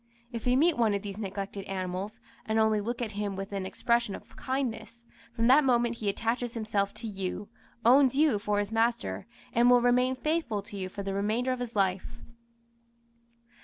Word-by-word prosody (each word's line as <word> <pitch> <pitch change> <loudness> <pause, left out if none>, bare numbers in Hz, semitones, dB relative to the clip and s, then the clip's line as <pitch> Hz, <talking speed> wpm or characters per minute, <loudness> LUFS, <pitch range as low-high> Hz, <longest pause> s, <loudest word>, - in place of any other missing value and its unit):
If 230 0 -5
you 250 +1 +4
meet 320 -1 +3
one 220 -3 +3
of 200 - -3
these 200 0 -6
neglected 195 -1 -5
animals, 190 +1 -4 0.3
and 220 0 +1
only 220 -1 +3
look 240 +3 -3
at 220 - -4
him 205 -1 -3
with 195 +1 -6
an 195 -1 -2
expression 235 -1 0
of - - -13
kindness, 235 -3 -4 0.3
from 230 -1 -1
that 265 +5 +6
moment 240 -2 +2
he 210 -3 -1
attaches 230 +3 -2
himself 210 -3 0
to 230 - -6
you, 195 0 -4 0.4
owns 265 +2 +6
you 290 -7 +3
for 205 0 -1
his 205 +1 -1
master, 230 +1 0 0.3
and 240 +1 +5
will 245 0 +7
remain 250 +1 +3
faithful 305 -8 -1
to 205 0 -10
you 190 -2 -4
for 200 +1 -6
the 195 0 -3
remainder 215 +6 0
of 255 - -2
his 240 -2 -5
life. 190 -2 0
220 Hz, 190 wpm, -29 LUFS, 200-245 Hz, 0.4 s, will